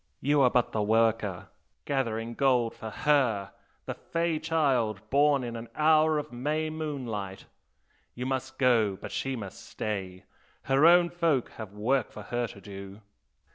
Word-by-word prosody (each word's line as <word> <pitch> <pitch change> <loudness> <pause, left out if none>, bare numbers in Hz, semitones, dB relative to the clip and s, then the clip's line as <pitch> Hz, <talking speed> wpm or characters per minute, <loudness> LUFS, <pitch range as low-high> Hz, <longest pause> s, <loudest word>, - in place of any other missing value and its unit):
You 145 +1 +2
are 130 - +6
but 125 -1 +1
the 110 - -1
worker, 110 -3 +1 0.4
gathering 115 -4 -1
gold 125 -3 +2
for 110 - -7
HER 120 -8 +1 0.3
the - - -3
"fey" 165 -1 -2
child 140 - +1
born 140 -1 +4
in 120 -1 -5
an 115 0 -7
hour 155 0 +4
of 150 - -4
May 150 +6 -2
moonlight! 125 -11 -5 0.7
You 125 - -4
must 130 0 -3
go, 115 -7 +3
but - - -8
she 135 0 -2
must 100 -5 -8
stay, 95 -3 -5 0.4
her 135 +4 +4
own 175 0 +6
folk 165 -7 +1
have 110 -3 -7
work 115 +4 0
for 105 - -9
her 120 +2 -2
to 100 - -12
do!' 100 +1 -10
125 Hz, 155 wpm, -28 LUFS, 110-145 Hz, 0.7 s, are